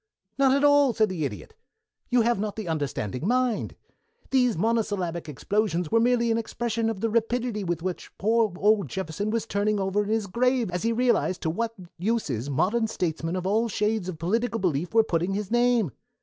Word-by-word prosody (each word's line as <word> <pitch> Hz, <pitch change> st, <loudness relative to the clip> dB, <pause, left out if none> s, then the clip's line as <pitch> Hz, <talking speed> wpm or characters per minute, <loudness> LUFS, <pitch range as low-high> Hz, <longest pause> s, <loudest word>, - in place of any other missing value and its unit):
"Not 270 Hz, -1 st, +5 dB
at 280 Hz, -, 0 dB
all," 285 Hz, -3 st, +5 dB
said 215 Hz, -2 st, +3 dB
the 170 Hz, -5 st, -2 dB
Idiot. 105 Hz, -, -7 dB, 0.6 s
"You 245 Hz, -1 st, +4 dB
have 235 Hz, -2 st, +1 dB
not 210 Hz, 0 st, -3 dB
the 215 Hz, -4 st, -5 dB
understanding 145 Hz, -, -2 dB
mind. 250 Hz, -1 st, 0 dB, 0.6 s
Those 250 Hz, -6 st, +3 dB
monosyllabic 190 Hz, -6 st, -1 dB
explosions 180 Hz, -, -1 dB
were 230 Hz, -, +4 dB
merely 235 Hz, 0 st, +2 dB
an 225 Hz, -, +2 dB
expression 230 Hz, 0 st, -2 dB
of 210 Hz, -4 st, -4 dB
the 225 Hz, -, +1 dB
rapidity 230 Hz, -1 st, 0 dB
with 170 Hz, -2 st, -2 dB
which 185 Hz, -1 st, -4 dB
poor 220 Hz, +1 st, +2 dB
old 205 Hz, -6 st, +2 dB
Jefferson 190 Hz, -, -3 dB
was 225 Hz, -1 st, -1 dB
turning 205 Hz, +1 st, 0 dB
over 195 Hz, +1 st, +1 dB
in 205 Hz, -, -6 dB
his 220 Hz, -1 st, +1 dB
grave 240 Hz, +2 st, +1 dB
as 180 Hz, 0 st, -2 dB
he 230 Hz, -, +1 dB
realized 235 Hz, -6 st, +1 dB
to 160 Hz, -, 0 dB
what 230 Hz, +5 st, -2 dB, 0.2 s
uses 165 Hz, -, -1 dB
modern 220 Hz, -, +1 dB
statesmen 165 Hz, -4 st, -2 dB
of 185 Hz, -1 st, -3 dB
all 220 Hz, +4 st, +1 dB
shades 210 Hz, -2 st, -1 dB
of 175 Hz, -, -5 dB
political 225 Hz, +8 st, -1 dB
belief 170 Hz, -2 st, -1 dB
were 225 Hz, 0 st, +5 dB
putting 180 Hz, -1 st, -1 dB
his 205 Hz, -1 st, -4 dB
name. 240 Hz, -, +3 dB
210 Hz, 190 wpm, -26 LUFS, 180-230 Hz, 0.6 s, Not